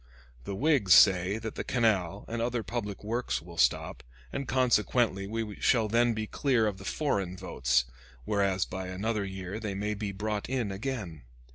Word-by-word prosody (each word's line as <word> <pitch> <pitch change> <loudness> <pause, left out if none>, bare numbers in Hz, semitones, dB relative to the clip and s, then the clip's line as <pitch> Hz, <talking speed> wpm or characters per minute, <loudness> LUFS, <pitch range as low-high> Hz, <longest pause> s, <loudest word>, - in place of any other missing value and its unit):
The 100 - -4
Whigs 125 - +4
say 95 +1 +5
that 110 0 -5
the - - -4
canal 105 -6 0
and 115 0 -3
other 120 -1 -1
public 105 -5 -4
works 115 +4 -1
will 85 +1 -11
stop, - - +2 0.3
and 140 - -3
consequently 120 -5 +2
we 110 -1 -4
shall 115 -4 +3
then 115 +1 +2
be 110 0 -2
clear 125 -1 +1
of 100 -3 -2
the 95 - -10
foreign 100 - -1
votes, 60 -9 +1 0.4
whereas 100 -3 +1
by 95 0 -5
another 105 +3 -2
year 95 +1 -5
they 105 -3 -4
may 105 +2 -1
be 105 -1 -4
brought 105 +2 -3
in 125 -6 -1
again. 100 - -4
105 Hz, 170 wpm, -29 LUFS, 95-115 Hz, 0.4 s, say